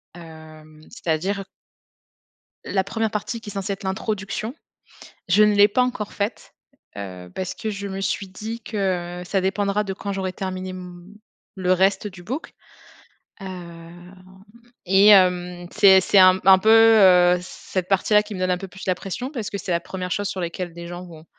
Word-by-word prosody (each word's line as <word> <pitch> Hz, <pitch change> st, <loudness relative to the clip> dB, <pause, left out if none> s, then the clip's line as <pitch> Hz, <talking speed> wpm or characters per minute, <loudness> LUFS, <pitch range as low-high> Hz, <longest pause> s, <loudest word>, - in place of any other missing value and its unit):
hem, 155 Hz, -2 st, -14 dB
c'est-à-dire 195 Hz, +1 st, -2 dB, 1.2 s
la 190 Hz, -1 st, 0 dB
1re 220 Hz, +2 st, -2 dB
partie 215 Hz, +2 st, -4 dB
qui 215 Hz, -, -9 dB
est -, -, -8 dB
censée 195 Hz, 0 st, -3 dB
être 195 Hz, -, -10 dB
l'introduction, 205 Hz, +4 st, -3 dB, 0.8 s
je 210 Hz, +4 st, +5 dB
ne 210 Hz, -1 st, +3 dB
l'ai 205 Hz, 0 st, +7 dB
pas 250 Hz, +5 st, +2 dB
encore 245 Hz, -5 st, -2 dB
faite, 205 Hz, +3 st, -4 dB, 0.4 s
heu, 90 Hz, -3 st, -8 dB
parce 185 Hz, -1 st, -4 dB
que 220 Hz, -, -5 dB
je 200 Hz, -1 st, -5 dB
me 195 Hz, 0 st, -5 dB
suis 195 Hz, 0 st, -2 dB
dit 220 Hz, +5 st, -7 dB
que, 180 Hz, -4 st, -3 dB
heu, -, -, -6 dB
ça 190 Hz, +2 st, -1 dB
dépendra 200 Hz, +2 st, 0 dB
de 195 Hz, -, -3 dB
quand 200 Hz, +1 st, -6 dB
j'aurai 190 Hz, -1 st, -3 dB
terminé 185 Hz, -1 st, -5 dB
m 180 Hz, -1 st, -10 dB, 0.5 s
le 185 Hz, -1 st, +1 dB
reste 195 Hz, +2 st, +1 dB
du 180 Hz, -2 st, -12 dB
book. 265 Hz, -, -6 dB, 0.9 s
Hem, 175 Hz, -1 st, -10 dB, 0.7 s
et, 195 Hz, +3 st, +5 dB
hem, 180 Hz, -2 st, +4 dB
c'est 195 Hz, -2 st, +6 dB
c'est 195 Hz, -, +2 dB
un 185 Hz, 0 st, +7 dB
un 190 Hz, -1 st, +8 dB
peu, 220 Hz, -, +2 dB
heu, 190 Hz, -6 st, +6 dB
cette 185 Hz, 0 st, -5 dB
partie 195 Hz, +2 st, +1 dB
là 210 Hz, 0 st, +6 dB
qui 210 Hz, 0 st, -9 dB
me -, -, -6 dB
donne 185 Hz, 0 st, 0 dB
un 180 Hz, -, +1 dB
peu 195 Hz, +1 st, -8 dB
plus 190 Hz, +1 st, -11 dB
la 185 Hz, -, +2 dB
pression, 220 Hz, +9 st, -6 dB
parce 230 Hz, -8 st, -5 dB
que 200 Hz, -, -5 dB
c'est 185 Hz, -, -5 dB
la 170 Hz, -, +2 dB
1re 180 Hz, 0 st, -6 dB
chose 205 Hz, -1 st, -1 dB
sur 185 Hz, -, -4 dB
laquelle 170 Hz, 0 st, -5 dB
des 170 Hz, 0 st, -9 dB
gens 175 Hz, +1 st, -8 dB
vont 160 Hz, -2 st, -13 dB
190 Hz, 190 wpm, -22 LUFS, 180-205 Hz, 1.2 s, un